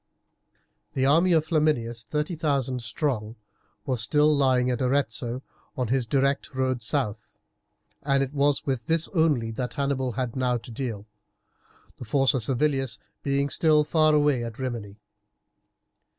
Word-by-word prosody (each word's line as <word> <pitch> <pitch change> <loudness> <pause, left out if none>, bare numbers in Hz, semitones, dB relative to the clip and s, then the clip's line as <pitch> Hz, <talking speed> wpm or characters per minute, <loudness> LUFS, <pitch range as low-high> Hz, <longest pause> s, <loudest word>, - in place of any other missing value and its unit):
The 130 - +1
army 165 +6 +4
of 160 -2 +3
Flaminius, 150 -8 0
30,000 150 -5 -1
strong, 115 -2 -2 0.5
was 125 -3 0
still 150 +7 +3
lying 130 -2 +2
at 125 - -2
Arezzo, 130 -1 -1 0.3
on 125 -4 -1
his 130 -2 +1
direct 140 +2 0
road 130 -2 0
south, 110 0 -3 0.6
and 140 -1 +2
it 135 +1 -5
was 145 0 +1
with 130 -5 -2
this 165 0 +1
only 150 - +1
that 125 +1 -4
Hannibal 135 -3 -1
had 125 0 -3
now 125 -2 +1
to 120 - -10
deal, 115 -4 -5 0.9
the 125 - -8
force 135 +4 +2
of 130 - 0
Servilius 135 +2 0 0.2
being 140 0 0
still 150 +1 +3
far 155 0 +3
away 145 -5 +2
at 115 -1 -6
Rimini. 115 -6 -5
130 Hz, 140 wpm, -26 LUFS, 120-145 Hz, 0.9 s, army